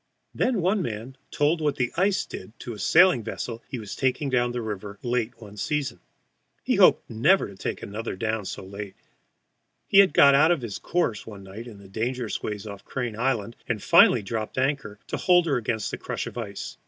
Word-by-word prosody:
Then 245 -6 +1
one 190 +4 +2
man 115 -1 -5
told 155 +3 +1
what 150 -2 +1
the 125 -2 -1
ice 190 +2 +2
did 115 - -10
to 120 - -6
a 105 - -10
sailing 175 - +5
vessel 115 +1 -5
he 130 - -4
was 105 -4 -7
taking 135 +1 0
down 120 -1 +2
the 120 - -3
river 105 -2 -5
late 120 -1 -1
one 105 -2 -12
season. 150 +5 -2 0.6
He - - +1
hoped - - +5
never 150 - +3
to 100 - -12
take - - -4
another 110 +2 -5
down 110 +1 -2
so - - -6
late. 100 +1 -8 0.9
He 195 - +6
had 195 -2 +6
got 140 0 +8
out 150 +4 +5
of 170 -5 +2
his 105 -4 -5
course 145 - -1
one 100 -3 -9
night 100 +5 -9
in 110 -4 -10
the 100 -1 -14
dangerous 115 +3 -3
ways 105 -1 -4
off 100 -2 -8
Crane 120 -4 -4
Island, 115 -2 -1
and 110 -4 -2
finally 115 - +6
dropped 110 +4 -4
anchor 130 -6 -1
to - - -4
hold 175 -1 +4
her 145 -5 +1
against 110 -2 -2
the - - -5
crush - - -4
of - - -8
ice. - - -6
120 Hz, 205 wpm, -25 LUFS, 105-140 Hz, 0.9 s, got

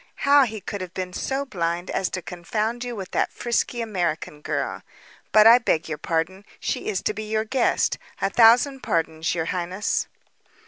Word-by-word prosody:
How 280 -1 +7
he 220 -3 -6
could 205 0 -5
have 185 -1 -7
been 180 -1 -4
so 275 +7 -2
blind 175 -6 -2
as 185 - 0
to 185 - -5
confound 215 +7 -3
you 245 -1 -5
with 190 -3 -7
that - - 0
frisky 240 0 -1
American 175 -8 -2
girl - - -3 0.5
but 215 0 +7
I 235 +2 +9
beg 170 -8 0
your 155 -2 -4
pardon. 170 +4 -2 0.2
She - - -3
is 195 -3 -1
to - - 0
be 215 0 -6
your 220 0 0
guest. 260 +4 +1 0.2
A 195 - 0
thousand 245 +5 +5
pardons, 160 0 -1
your 165 -1 -1
highness." 180 +4 -1
200 Hz, 180 wpm, -24 LUFS, 175-230 Hz, 0.5 s, I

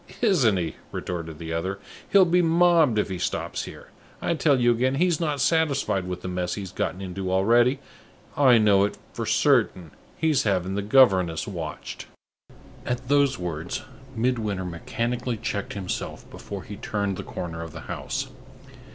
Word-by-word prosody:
"Isn't 140 - +4
he!" 85 -3 -3
retorted 80 -3 -5
the 80 0 -5
other. 95 +4 -2 0.3
"He'll 195 -2 +6
be 180 +1 +3
mobbed 165 -6 +4
if 105 - +1
he 95 -2 -4
stops 90 - -2
here! - - -11 0.3
I - - 0
tell 150 -4 +3
you 120 0 +4
again, 130 +3 +1
he's 175 +1 +2
not 150 -4 -1
satisfied 140 - +1
with 90 -1 -5
the - - -4
mess 90 -1 -2
he's 95 -3 -6
got 90 - -2
into 95 0 -4
already. 120 +7 +4 0.6
I 130 -4 +6
know 105 -3 +5
it 100 - -1 0.2
for 115 -2 -4
certain, 110 - +2 0.3
he's 160 -3 +2
having 95 -3 0
the 100 - -1
governess 95 -7 +4
watched." - - -6 0.8
At 125 +1 -3
those 140 -1 +3
words, 85 -1 -4 0.3
Midwinter 110 -5 -1
mechanically 120 +7 -3
checked 105 -2 -3
himself 95 -3 -5
before 100 -2 -7
he 105 - -8
turned 100 -2 -2
the - - -5
corner 85 -2 -6
of 85 -1 -7
the - - -9
house. - - -4
105 Hz, 160 wpm, -25 LUFS, 90-135 Hz, 0.8 s, He'll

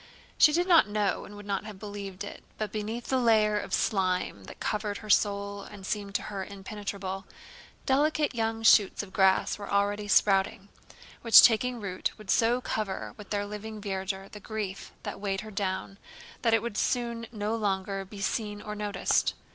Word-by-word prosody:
She 305 - +8
did 350 +4 +1
not 335 - +6
know 205 -1 0
and 205 - -11
would 205 0 -10
not 200 -1 -2
have 215 -2 -8
believed 200 -1 -7
it, 205 - -9
but 215 -2 -3
beneath 220 +3 -4
the 260 - +2
layer 215 -3 +4
of - - -7
slime 185 - 0
that - - -11
covered 210 -1 -2
her 215 -1 -3
soul 200 0 +1
and 200 -1 -10
seemed 200 0 -3
to - - +2
her 200 -2 -4
impenetrable, 195 -1 -6 0.6
delicate 295 +2 +2
young 225 -1 -1
shoots 210 -2 +5
of 190 -2 -12
grass 190 +1 +3
were 205 - -7
already 205 +1 +1
sprouting, 195 0 +3 0.5
which 230 -2 +9
taking 245 +1 +4
root 195 -3 -3
would 210 -4 -4
so 235 +2 +3
cover 215 -5 -3
with 210 -2 -12
their 205 -1 -1
living 210 +1 -7
verdure 195 -1 -3
the 210 - -11
grief 205 -2 -5
that - - -5
weighed 195 -1 -1
her 215 - -9
down 195 0 -3 0.4
that 230 -2 +4
it 225 - 0
would 235 -3 -3
soon 235 -2 -1
no 215 0 -2
longer 195 -2 -1
be 195 +1 -10
seen 210 0 -2
or 210 0 -6
noticed. 210 -1 0
205 Hz, 180 wpm, -28 LUFS, 195-220 Hz, 0.6 s, which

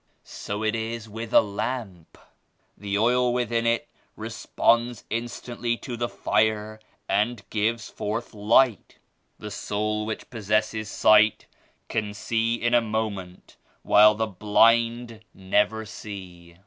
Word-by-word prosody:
So 105 +1 -6
it 110 0 +1
is 115 0 -4
with 110 +1 -7
a - - +7
lamp; 100 -4 -5 0.6
the 100 0 -3
oil 125 +3 +3
within 120 -1 0
it 115 0 +1 0.3
re - - -6
sponds 120 -1 +1
instantly 120 +1 -3
to 120 - -6
the 120 0 -2
fire 110 0 0 0.3
and 105 +1 0
gives 110 +1 -1
forth 115 +4 -4
light. 110 +2 +2 0.4
The 105 -1 -8
soul 105 +1 -2
which 110 - -6
possesses 110 -1 -1
sight 110 +1 +4 0.4
can 105 -2 -3
see 115 +2 0
in 120 0 -1
a 120 - +5
moment 105 -5 -5 0.3
while 105 +1 +6
the 110 +1 0
blind 115 +3 +2
never 105 +3 0
see. 90 -5 -10
110 Hz, 125 wpm, -25 LUFS, 105-115 Hz, 0.6 s, a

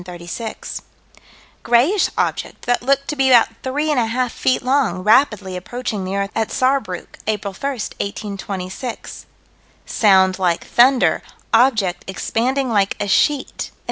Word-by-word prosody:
Sci._, - - -11
1 180 - -7
136); 175 +6 -6 0.8
grayish 275 - +3
object - - -2
that 245 0 +1
looked 275 +2 +1
to 300 - -3
be 270 -2 +2
about 240 -3 +6
three 290 +4 -1
and 285 - +2
a 230 - +1
half 245 +1 -1
feet 255 - 0
long, 250 -9 +1
rapidly 210 -4 +3
approaching 210 +2 -4
the 190 +1 -3
earth 200 0 -2
at 225 -1 0
Saarbruck, 255 -9 -1
April 205 -2 -2
1, 275 +9 -3
1826; 200 -2 -6 0.6
sound 190 -3 +3
like 175 -3 0
thunder; 255 +1 +4 0.3
object 220 -7 +3
expanding 255 +7 -1
like 200 -2 +1
a 205 - -2
sheet 280 +7 +1
(_Am. - - -33
225 Hz, 145 wpm, -19 LUFS, 195-260 Hz, 0.8 s, about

